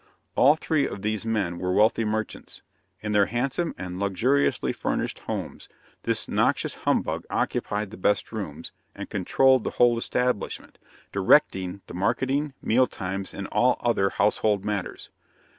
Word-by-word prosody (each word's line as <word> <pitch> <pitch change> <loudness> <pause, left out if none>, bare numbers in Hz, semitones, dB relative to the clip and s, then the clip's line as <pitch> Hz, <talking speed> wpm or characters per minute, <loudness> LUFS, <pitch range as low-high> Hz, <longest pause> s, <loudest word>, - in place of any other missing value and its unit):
All 145 +4 +6
three 155 -2 0
of 100 - -7
these 110 +1 -2
men 100 -6 -1
were 90 0 -1
wealthy 110 +3 +3
merchants. 110 0 -4 0.4
In 105 - -3
their 105 -1 +4
handsome 135 +8 -1
and 90 0 -6
luxuriously 115 +9 +1
furnished - - -2
homes, - - -6 0.3
this - - -1
noxious - - +1
humbug - - -1
occupied 105 -1 -1
the 115 - -9
best 100 +2 +1
rooms, - - -6 0.2
and - - -8
controlled 130 +6 +3
the - - -1
whole 120 -1 +4
establishment, 125 -3 -2 0.3
directing 95 +1 +2
the - - -10
marketing, 130 +9 0
meal 125 +3 +3
times, 95 +1 -5
and 100 - -5
all 125 +1 +3
other 105 -5 +2
household 105 0 +1
matters. 105 -3 -4
105 Hz, 140 wpm, -25 LUFS, 100-125 Hz, 0.4 s, All